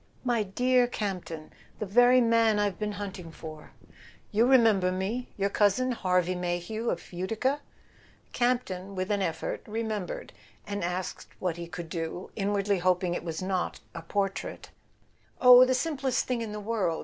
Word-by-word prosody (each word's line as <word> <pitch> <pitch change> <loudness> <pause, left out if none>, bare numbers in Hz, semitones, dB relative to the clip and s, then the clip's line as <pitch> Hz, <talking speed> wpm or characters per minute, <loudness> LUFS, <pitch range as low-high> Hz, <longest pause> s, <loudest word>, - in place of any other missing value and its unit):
"My 240 -3 +1
dear 245 +5 +2
Campton—the 190 -4 -6
very 245 +5 +5
man 230 -2 +4
I've 205 -3 0
been 210 -1 -2
hunt¬ 200 -1 -5
ing 165 -2 -9
for! 155 -2 -10 0.6
You 225 +4 +3
remember 225 -8 +5
me—your 200 +1 -2
cousin 210 +6 +2
Harvey 180 -5 +1
May 175 -1 -1
hew 220 +7 -3
of 170 - -4
Utica 225 +11 -1 0.4
?" - - -30
Campton, 220 -6 -1
with 185 +2 -2
an 205 -1 +1
effort, 165 -3 -2
remembered, 215 -3 -4 0.3
and 205 -2 -3
asked 180 +1 -3
what 180 -3 -1
he 170 0 -6
could 170 0 -7
do, 165 +2 -5
inwardly 200 -1 0
hoping 180 0 +1
it - - -3
was 165 +1 -4
not 185 -1 -1
a 165 - -6
por¬ 195 +3 0
trait. - - -7 0.7
"Oh, 250 0 +9
the 255 0 +2
simplest 270 -3 0
thing 250 -2 -1
in 225 -2 -4
the 210 - -5
world. 205 -6 -1
200 Hz, 160 wpm, -28 LUFS, 180-230 Hz, 0.7 s, Oh